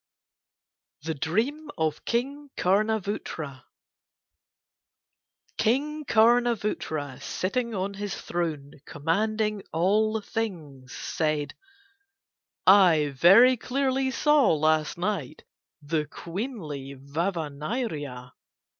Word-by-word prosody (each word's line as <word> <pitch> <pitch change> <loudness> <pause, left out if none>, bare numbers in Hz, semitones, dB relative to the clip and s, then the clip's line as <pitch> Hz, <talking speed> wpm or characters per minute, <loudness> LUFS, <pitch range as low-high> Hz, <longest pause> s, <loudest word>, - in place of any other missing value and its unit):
THE 160 +1 -2
DREAM 225 - -1
OF 155 -2 -1
KING 280 +5 -2
KARNA 215 +4 +2
VOOTRA 155 -9 -5 1.9
King 295 +6 0
Karna 240 +1 +4
Vootra 150 - -4
sitting 230 - -2
on 195 +1 -2
his 200 0 -4
throne 155 -5 -4
commanding 210 +7 -1
all 215 +6 +2
things 160 - -5
said: 155 -2 -2 1.1
"I 170 -7 +6
very 215 - +7
clearly 265 +2 0
saw 295 +1 +4
last 155 +1 +1
night 175 -6 -3 0.4
the 150 0 -1
queenly 165 - -6
Vava 155 +4 -3
Nyria. 145 - -4
185 Hz, 85 wpm, -26 LUFS, 150-225 Hz, 1.9 s, very